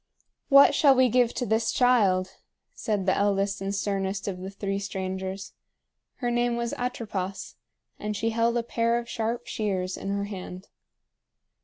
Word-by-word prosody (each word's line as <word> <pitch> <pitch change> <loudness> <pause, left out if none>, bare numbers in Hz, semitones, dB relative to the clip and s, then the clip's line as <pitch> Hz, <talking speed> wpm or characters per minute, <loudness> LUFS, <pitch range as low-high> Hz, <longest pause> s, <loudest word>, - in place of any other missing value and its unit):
"What 280 0 +8
shall 280 -1 +5
we 255 -1 +4
give 245 0 +3
to 245 - -1
this 220 +1 +1
child?" 200 -7 +3 0.4
said 205 -3 -2
the 190 - +3
eldest 200 0 0
and 195 - -2
sternest 195 0 -2
of 185 -2 -3
the 190 +1 -6
three 195 0 -3
strangers. 190 0 -5 0.6
Her 245 -2 -2
name 240 0 +1
was 235 0 -2
Atropos, 210 -6 -4 0.5
and 210 0 -3
she 225 +2 0
held 230 +1 +1
a 235 - 0
pair 230 0 0
of 240 0 -4
sharp 235 +1 -3
shears 190 -4 -2
in 195 - -5
her 200 0 -1
hand. 190 -2 -8
205 Hz, 160 wpm, -26 LUFS, 195-235 Hz, 0.6 s, What